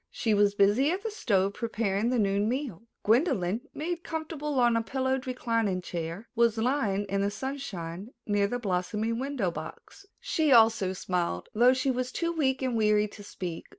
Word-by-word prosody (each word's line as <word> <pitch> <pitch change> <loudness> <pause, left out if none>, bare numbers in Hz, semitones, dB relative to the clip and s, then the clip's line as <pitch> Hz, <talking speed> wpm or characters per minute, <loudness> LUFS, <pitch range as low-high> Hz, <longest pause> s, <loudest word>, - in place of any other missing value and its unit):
She 225 -3 0
was 205 0 +3
busy 205 +8 +4
at 375 +4 -2
the 445 - -3
stove 200 - +1
preparing 220 -1 -1
the 250 - +1
noon 200 0 +1
meal. 240 - -4 0.2
Gwendolyn, 225 - +2
made 340 +2 -4
comfortable 310 -3 -3
on 240 -1 +4
a 230 - +2
pillowed 260 +2 -1
reclining 230 -6 0
chair, 175 +4 -5
was 235 -2 +2
lying 220 -5 0
in 195 0 -1
the 200 - +1
sunshine 205 -6 -5 0.2
near 205 -1 +2
the 245 - -2
blossoming 210 +2 -1
window 260 -9 -1
box. 165 - -10
She 310 -3 0
also 225 -5 +5
smiled, 175 - -2
though 245 +4 +5
she 260 +1 +1
was 255 0 -2
too 335 0 -1
weak 270 -5 0
and 255 -2 0
weary 210 -1 +3
to 205 - -12
speak. 175 -4 -6
225 Hz, 175 wpm, -28 LUFS, 200-265 Hz, 0.2 s, also